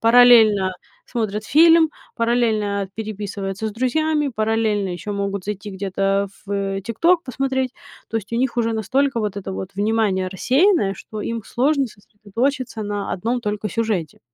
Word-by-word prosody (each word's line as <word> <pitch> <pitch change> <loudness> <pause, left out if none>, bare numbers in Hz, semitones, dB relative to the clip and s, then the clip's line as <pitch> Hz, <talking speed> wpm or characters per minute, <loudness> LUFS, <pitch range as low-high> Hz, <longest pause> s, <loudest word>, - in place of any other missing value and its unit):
параллельно 225 -5 +6 0.3
смотрят 215 -3 -2
фильм, 325 +3 +6 0.3
параллельно 220 -4 +1
переписываются 205 -1 -4
с - - -7
друзьями, 295 +4 0
параллельно 215 -2 +1
еще 200 +4 -5
могут 200 -1 -3
зайти 205 0 -5
где-то 195 +1 0 0.2
в, - - -9
э, 195 -1 -1
"ТикТок" 330 - +2
посмотреть. 265 0 -1 0.4
То 225 - -2
есть 215 +1 -5
у - - 0
них 250 0 0
уже 230 -1 +1
настолько 255 +4 0
вот 205 -2 -2
это 190 -1 -5
вот 190 0 -5
внимание 205 -3 +1
рассеянное, 255 - +2
что 215 +2 -8
им 230 +1 -3
сложно 275 +2 +1
сосредоточиться 225 +4 -3
на 205 -1 -3
одном 235 +6 -1
только 210 -1 -3
сюжете. 210 -8 -2
220 Hz, 145 wpm, -21 LUFS, 200-245 Hz, 0.4 s, параллельно